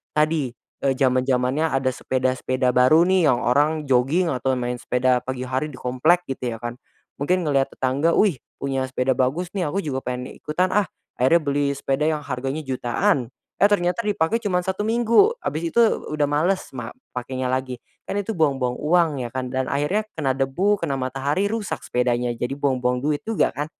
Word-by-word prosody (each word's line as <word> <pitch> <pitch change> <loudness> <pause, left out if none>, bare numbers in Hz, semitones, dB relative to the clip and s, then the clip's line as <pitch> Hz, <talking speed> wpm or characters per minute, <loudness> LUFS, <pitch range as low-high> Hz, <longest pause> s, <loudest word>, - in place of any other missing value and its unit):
tadi, 150 -4 +1 0.3
eee, 135 -1 +3
zaman-zamannya 130 +2 +2
ada 135 -1 +1
sepeda-sepeda 130 0 0
baru 130 +7 +6
nih, 185 -4 +4
yang 120 - +1
orang 150 +5 +2
jogging, 135 +8 +3
atau 130 +1 0
main 125 0 -2
sepeda 125 0 +1
pagi 130 -1 -4
hari 130 +4 -1
di - - -10
komplek, 155 +8 +2
gitu 125 -3 -3
ya - - -8
kan? 120 0 -5 0.4
Mungkin 180 +6 +1
ngelihat 135 -2 +1
tetangga, 140 +6 +1
"Wih, 200 -9 +3 0.2
punya 135 -1 -1
sepeda 130 0 0
bagus 140 +8 0
nih, 185 -3 0
aku 175 +7 -1
juga 135 -3 -3
pengen 125 0 -3
ikutan 180 +5 0
ah!" 210 0 +3 0.3
Akhirnya 150 +7 +4
beli 140 -1 0
sepeda 140 +1 -1
yang 155 -1 0
harganya 135 +2 -3
jutaan, 130 - 0 0.3
eh, 200 - +5
ternyata 180 +2 +1
dipakai 205 0 +1
cuma 180 -4 +1
1 190 +3 -2
minggu, 235 - +4
habis 165 +2 -2
itu - - +3
u 225 -8 +1
udah 150 -1 +1
males 170 +6 0
mak 120 -2 -6 0.2
pakainya 130 +1 -3
lagi. 130 -1 -2 0.2
Kan 200 - -2
itu 220 +2 -4
buang-buang 135 -5 +1
uang 155 -4 +1
ya - - -5
kan? 130 -1 -3
Dan 130 +1 -1
akhirnya 150 +10 0
kena 145 -4 0
debu, 175 +10 +1
kena 160 -5 -1
matahari 135 +9 -1
rusak 220 -2 -3
sepedanya. 125 0 0
Jadi 120 +3 -3
buang-buang 125 -3 0
duit 145 +1 -1
juga 225 -2 +1
kan? 145 +2 -2
140 Hz, 180 wpm, -23 LUFS, 130-170 Hz, 0.4 s, baru